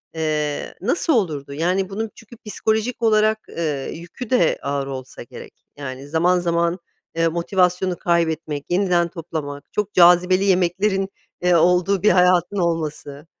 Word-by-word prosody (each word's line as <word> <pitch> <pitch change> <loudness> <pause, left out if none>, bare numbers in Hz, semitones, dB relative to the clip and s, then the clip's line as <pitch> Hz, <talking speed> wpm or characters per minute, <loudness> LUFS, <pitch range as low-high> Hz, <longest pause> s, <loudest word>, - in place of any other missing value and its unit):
eee, 150 -2 -2
nasıl 310 - +1
olurdu? 155 - -1
Yani, 180 +5 0
bunun 215 +2 -4
çünkü 225 +2 -14
psikolojik 220 +3 -1
olarak, 215 -1 +3
eee, 150 -5 -3
yükü 175 +9 -9
de 255 - +2
ağır 140 -1 -2
olsa 130 -1 -7
gerek. - - -12 0.2
Yani, 135 -1 -7
zaman 175 +4 +2
zaman, 170 +1 0 0.4
eee, 165 0 +2
motivasyonu 180 +2 0
kaybetmek, 160 -4 -1
yeniden 175 -2 +2
toplamak, 155 -4 -7
çok 210 -1 -2
cazibeli 180 +1 +5
yemeklerin, 190 +1 +1 0.3
eee, 180 0 +3
olduğu 180 +3 +3
bir 210 - +6
hayatın 180 +1 +3
olması... 155 -4 -3
175 Hz, 135 wpm, -21 LUFS, 160-195 Hz, 0.4 s, bir